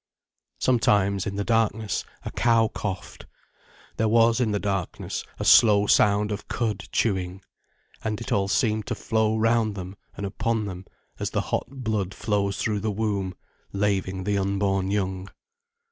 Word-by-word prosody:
Sometimes, 100 -6 +2
in 100 - -3
the 100 - -1
darkness, 110 -1 0 0.2
a - - -4
cow 115 -1 +3
coughed. 95 -3 -6 0.7
There 110 - +2
was, 115 +1 +4
in 115 - +2
the 105 - +1
darkness, 100 -3 -3
a - - -4
slow 105 -3 +7
sound 105 0 +3
of 105 - -5
cud 110 -3 -2
chewing. 95 -3 -1 0.6
And 110 -1 -2
it - - -7
all 100 -1 +2
seemed 110 +1 +1
to - - -2
flow 110 0 0
round 115 -1 +2
them 95 0 -7 0.2
and 100 - -3
upon 110 +3 -1
them 95 -1 -7 0.3
as - - -2
the - - 0
hot - - -2
blood 110 -8 -3
flows 100 -3 -1
through 105 +2 -1
the 110 - -2
womb, 100 -3 -2 0.4
laving 95 -2 0
the 100 +1 0
unborn 95 -1 0
young. 95 -1 -2
105 Hz, 155 wpm, -25 LUFS, 95-110 Hz, 0.7 s, slow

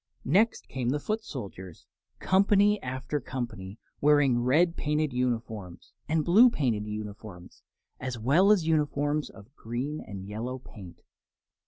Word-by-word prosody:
Next 200 - +2
came 125 -2 -3
the 145 +3 0
foot 215 +8 -3
soldiers, 95 - -9 0.3
company 200 +2 +3
after 130 +3 -3
company, 115 -7 -6 0.2
wearing 145 -4 +4
red 165 +8 +3
painted 150 -1 -1
uniforms 115 -7 -3 0.2
and 155 -1 +1
blue 220 +9 +7
painted 115 - -1
uniforms, 105 -3 -8 0.4
as 130 -2 -4
well 150 - +4
as 190 -6 +3
uniforms 150 -1 0
of 110 +4 -16
green 130 +7 -4
and 95 -2 -8
yellow 115 +6 -5
paint. 95 -8 -13
130 Hz, 130 wpm, -28 LUFS, 110-155 Hz, 0.4 s, blue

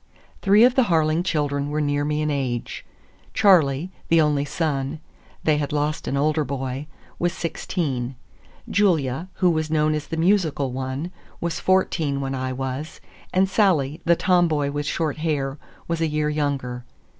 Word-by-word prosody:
Three 205 +3 +6
of 250 +1 +6
the 260 -2 +3
Harling 160 -3 +2
children 145 -5 -1
were 150 +1 -1
near 145 -1 0
me 150 +1 0
in 150 - 0
age. 130 -4 -3 0.5
Charley, 170 -4 +4 0.2
the 165 - +4
only 150 -2 +2
son,—they 150 0 -3
had 145 -1 -2
lost 150 +1 -1
an 140 - 0
older 155 +2 +2
boy,—was 140 +5 -4
sixteen; 140 -7 -3 0.5
Julia, 165 -6 +1
who 180 -2 +2
was 155 -1 -1
known 155 0 +2
as 150 -1 -3
the 165 - -4
musical 160 -6 +2
one, 130 +6 -4 0.3
was 170 -1 -2
fourteen 165 -6 +1
when 135 -1 -3
I 130 -1 -2
was; 135 +4 -5 0.3
and 190 +1 +3
Sally, 170 -7 +2
the 170 - +4
tomboy 165 -6 +2
with 145 0 -3
short 160 -2 -1
hair, 145 -3 -2 0.3
was 170 -1 -2
a 165 - +2
year 150 0 0
younger. 140 -5 -2
150 Hz, 155 wpm, -23 LUFS, 140-165 Hz, 0.5 s, Three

